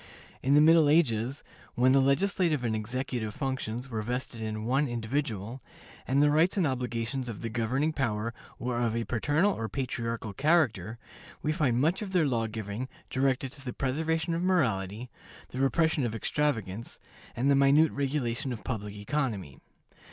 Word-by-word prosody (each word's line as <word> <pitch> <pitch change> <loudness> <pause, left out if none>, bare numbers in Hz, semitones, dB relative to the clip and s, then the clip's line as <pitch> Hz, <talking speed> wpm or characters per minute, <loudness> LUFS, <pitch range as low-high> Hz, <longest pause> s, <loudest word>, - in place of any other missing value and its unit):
In 140 +2 +3
the 150 - +7
Middle 160 -1 +6
Ages, 130 -4 +2 0.3
when 125 +1 +4
the 135 - +5
legislative 155 +1 +2
and 115 -2 0
executive 115 0 -3
functions 130 -3 -3
were 115 -4 -3
vested 120 0 -3
in 110 0 -4
one 135 +5 +2
individual, 120 -1 -3 0.5
and 140 +3 +3
the 145 - +4
rights 165 +6 +3
and 185 - +3
obligations 125 -1 -2
of 115 - -7
the 115 - -2
governing 130 +7 0
power 115 -4 -1 0.2
were 120 -1 -2
of 115 -2 0
a 115 - 0
paternal 145 - +1
or 110 0 -4
patriarchal 115 -5 -3
character, 130 - +2 0.5
we 155 - +1
find 145 -7 +1
much 165 +9 +2
of 195 -2 -5
their 175 -4 +4
law 115 -5 0
giving 110 +3 -5 0.2
directed 130 0 0
to 140 0 -12
the 125 -2 -5
preservation 160 +5 -1
of 165 - -1
morality, 120 - 0 0.4
the 130 - -6
repression 155 +2 +2
of 115 -2 -1
extravagance, 115 -5 -2 0.4
and 135 +4 +2
the - - +5
minute 140 +3 +5
regulation 135 -1 -1
of 115 - -6
public 105 -5 -4
economy. 105 - -3
130 Hz, 165 wpm, -29 LUFS, 115-145 Hz, 0.5 s, the